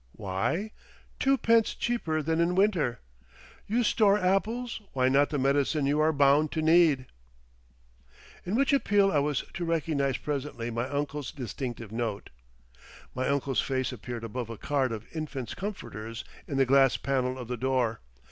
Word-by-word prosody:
WHY? 105 - -2 0.5
Twopence 230 -4 +3
Cheaper 160 -10 -1
than 160 +2 0
in 175 +1 +1
Winter. 185 - +1 0.7
You 235 +4 +1
Store 210 -2 +4
Apples! 220 +6 0
why 130 -1 +2
not 140 +2 +3
the 150 - -2
Medicine 140 +2 +1
You 145 +2 +1
are 155 +1 +4
Bound 145 +1 +3
to 160 - -1
Need? 160 -5 +4 1.4
in 185 +4 -2
which 275 +3 +2
appeal 205 -7 +3
I 150 - +3
was 145 -1 0
to 175 - -4
recognise 155 -5 0
presently 140 -5 -4
my 120 +3 -2
uncle's 145 -1 -3
distinctive 120 -3 -6
note. 115 -3 -3 0.8
My 130 +1 -2
uncle's 140 -2 +1
face 130 -1 -1
appeared 120 -1 -7
above 115 +1 -5
a 115 - -6
card 135 -1 0
of 110 0 -5
infant's 140 -6 -4
comforters 115 - -6 0.2
in 140 - -3
the 135 - +4
glass 135 0 +4
pane 130 -1 -1
of 125 -3 -7
the 125 - -3
door. 125 -2 0
140 Hz, 155 wpm, -28 LUFS, 125-170 Hz, 1.4 s, Store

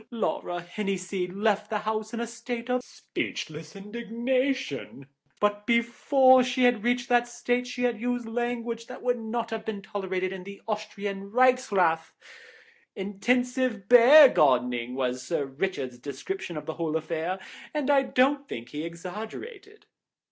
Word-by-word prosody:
Laura 185 -6 -2
Henniseed 185 -1 -3
left 210 +1 0
the 215 - 0
house 215 +1 -3
in 235 - -4
a 235 - -1
state 235 +1 -5
of 250 0 +1
speechless 155 -7 -6
indignation, 235 - -2 0.3
but 205 0 0
before 255 +3 +5
she 250 +1 0
had 245 -4 +4
reached 245 0 +1
that 240 0 +3
state 245 +1 -1
she 250 0 -4
had 235 -3 0
used 245 -1 -1
language 235 0 -3
that 255 - -10
would 245 -1 +1
not 230 +1 -3
have 225 -1 -3
been 220 -2 -4
tolerated 190 -2 -3
in 190 -1 -7
the 200 +1 -10
Austrian 205 -2 -4
Reichsrath. 200 -10 +3 0.8
Intensive 245 +2 0
bear 255 +6 +10
gardening 125 - +2
was 125 -1 -1
Sir 145 +3 -2
Richard's 135 -3 -3
description 160 - -5
of 150 - -6
the 160 - -4
whole 160 -1 -1
affair, 165 +3 -3 0.3
and 295 -2 0
I 275 -1 +5
don't 275 +2 +1
think 115 0 -6
he 150 +1 -5
exaggerated." 220 - -8
220 Hz, 145 wpm, -27 LUFS, 185-245 Hz, 0.8 s, bear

